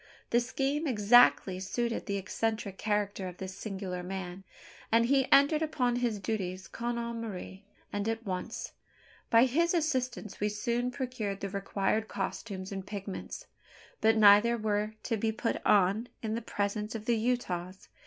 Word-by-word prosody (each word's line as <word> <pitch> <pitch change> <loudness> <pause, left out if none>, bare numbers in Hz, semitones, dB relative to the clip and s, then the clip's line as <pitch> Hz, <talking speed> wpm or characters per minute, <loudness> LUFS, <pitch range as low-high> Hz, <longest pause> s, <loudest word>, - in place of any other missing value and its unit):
The 240 - +5
scheme 270 +5 -1
exactly 210 -5 +5
suited 230 +5 -2
the 200 -1 -1
eccentric 200 0 -2
character 205 -2 -1
of 180 -1 -8
this 190 0 -6
singular 190 -3 -5
man; 185 0 -6 0.5
and 230 +1 +5
he 270 +1 +2
entered 285 +3 +6
upon 255 -6 +1
his 240 -3 0
duties 190 -3 -3
con 240 0 -3
amore, 230 -5 -5 0.3
and 205 +2 -1
at 225 0 -3
once. 185 -2 -4 0.6
By 230 +2 +6
his 335 +7 +2
assistance 255 - -1
we 210 - +1
soon 235 +4 -1
procured 245 -6 -4
the 195 - -3
required 200 +2 -1
costumes 190 -4 -4
and 195 -1 -4
pigments; 200 -1 -6 0.6
but 220 +1 +4
neither 215 +3 +7
were 215 0 -1
to 230 - -1
be 220 +1 0
"put 225 +1 -2
on" 205 +4 +3 0.2
in 220 -1 -1
the 230 - -2
presence 210 0 -2
of 215 -1 -5
the 235 - +3
Utahs. 190 -6 -2
215 Hz, 155 wpm, -30 LUFS, 195-240 Hz, 0.6 s, neither